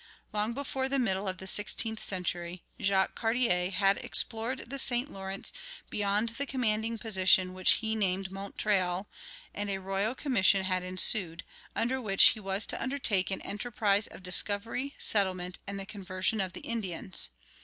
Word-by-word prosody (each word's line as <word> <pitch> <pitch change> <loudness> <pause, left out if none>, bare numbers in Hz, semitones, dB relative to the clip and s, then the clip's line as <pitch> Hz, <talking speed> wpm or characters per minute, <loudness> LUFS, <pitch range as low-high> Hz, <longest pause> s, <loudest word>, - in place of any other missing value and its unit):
Long 210 +2 -1
before 265 0 -3
the 275 - 0
middle 200 -6 0
of 185 -1 -2
the 190 - -10
sixteenth 210 +3 +2
century 175 -2 -2 0.2
Jacques 195 -1 +1
Cartier 225 -6 +1
had 195 +1 +2
explored 230 +3 0
the 275 +3 -3
St. 250 +2 +3
Lawrence 195 0 -3 0.4
beyond 205 +2 0
the 275 +5 -4
commanding 225 -3 -1
position 185 -4 +3
which 185 0 +4
he 220 -1 -2
named 190 -2 -1
Montreal, 195 -1 -1 0.5
and 205 0 -4
a 195 - -2
royal 195 +5 -2
commission 200 -9 +3
had 185 -1 0
issued, 185 -1 +3 0.3
under 255 +3 -1
which 195 -4 +6
he 220 - -3
was 195 +1 0
to - - -1
undertake 255 -8 0
an 190 - -3
enterprise 205 -1 0
of - - -13
"discovery, 210 - +1
settlement, 185 -3 0
and 200 0 -5
the 195 - -5
conversion 190 +1 -1
of 185 -2 -4
the - - -8
Indians." 190 - -2
200 Hz, 155 wpm, -29 LUFS, 190-225 Hz, 0.5 s, which